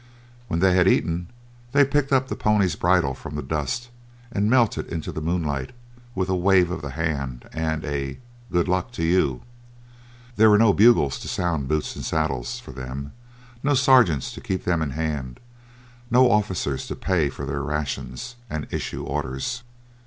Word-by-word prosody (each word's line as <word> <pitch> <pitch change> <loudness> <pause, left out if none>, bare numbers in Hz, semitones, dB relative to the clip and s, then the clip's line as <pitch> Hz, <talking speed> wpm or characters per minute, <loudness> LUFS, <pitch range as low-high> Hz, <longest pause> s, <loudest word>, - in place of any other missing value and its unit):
When 85 -5 -1
they 95 -1 +5
had 90 0 +4
eaten 85 -1 +1 0.5
they 145 0 +6
picked 140 0 0
up 130 -1 +3
the - - -3
pony's 100 -6 +2
bridle 85 -6 +2
from - - -8
the - - -3
dust 80 - -3 0.4
and 105 -1 +1
melted 120 -3 +2
into 80 -2 -4
the 80 - -5
moonlight 75 -5 -2 0.4
with 95 -1 0
a 95 - +1
wave 90 -1 +4
of 90 - -4
the 70 - -5
hand 70 -4 -3
and 80 -1 -2
a 70 -2 -3 0.3
"good 85 0 +2
luck 90 +4 0
to 85 - -3
you." 80 -7 +2 0.9
There 110 +1 +7
were 105 - +6
no 110 -2 +5
bugles 105 - +4
to - - -8
sound 85 -6 -1
"boots 75 +1 -1
and - - -6
saddles" 80 -6 -1
for - - -11
them, 65 +2 -6 0.5
no 145 0 +2
sergeants 125 - +4
to - - -9
keep 95 - -3
them 85 -2 +1
in 75 - -1
hand, 75 -4 -3 0.7
no 125 +1 +5
officers 95 -9 0
to - - -4
pay 85 -6 +1
for 70 - -6
their 70 +1 -3
rations 75 - -4
and 75 -2 -3
issue - - -4
orders. 65 - -3
85 Hz, 175 wpm, -24 LUFS, 70-100 Hz, 0.9 s, There